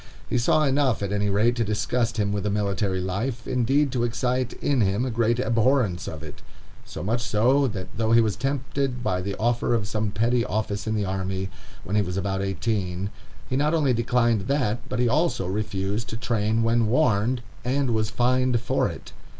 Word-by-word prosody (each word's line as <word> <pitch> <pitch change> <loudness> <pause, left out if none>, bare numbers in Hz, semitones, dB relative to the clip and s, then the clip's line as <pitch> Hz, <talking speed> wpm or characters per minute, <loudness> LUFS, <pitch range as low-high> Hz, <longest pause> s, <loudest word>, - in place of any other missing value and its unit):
He 125 - 0
saw 155 +6 +3
enough, 135 -6 +2
at 100 - -2
any 105 0 0
rate, 110 +5 +2
to 115 - +2
disgust 115 +3 -1
him 100 -2 +1
with 100 -1 -2
a - - +1
military 100 -2 0
life, 110 +7 -3
indeed 130 +3 +2
to 125 -2 0
excite 125 +1 -1
in 140 -4 0
him 100 +4 +1
a 130 - -2
great 115 +1 +1
abhorrence 115 -6 +1
of 80 -3 -6
it; - - -10 0.4
so - - -7
much 115 +5 0
so, 125 +5 +3
that 100 -6 -5
though 110 +2 0
he 115 - +7
was 110 -3 +2
tempted 135 -1 -2
by 90 -4 0
the 100 +1 -3
offer 120 +1 +1
of 105 -3 -1
some 105 +1 -1
petty 115 +4 +1
office 105 0 -2
in 110 - 0
the 105 -2 0
army, 95 0 -3 0.3
when 95 +5 -3
he 105 - +4
was 90 -1 -3
about 95 0 -1
eighteen, 95 0 -2 0.4
he 130 - -2
not 150 +4 +2
only 145 -5 +2
declined 115 -3 +1
that, 125 -5 +1
but - - -2
he 125 0 +2
also 150 - +1
refused 105 +3 -2
to 115 - -4
train 115 -1 0
when 115 0 +2
warned, 120 -1 +2 0.2
and 130 +1 0
was 110 -1 +1
fined 125 +1 +2
for 125 - 0
it. - - -10
115 Hz, 200 wpm, -25 LUFS, 100-125 Hz, 0.4 s, he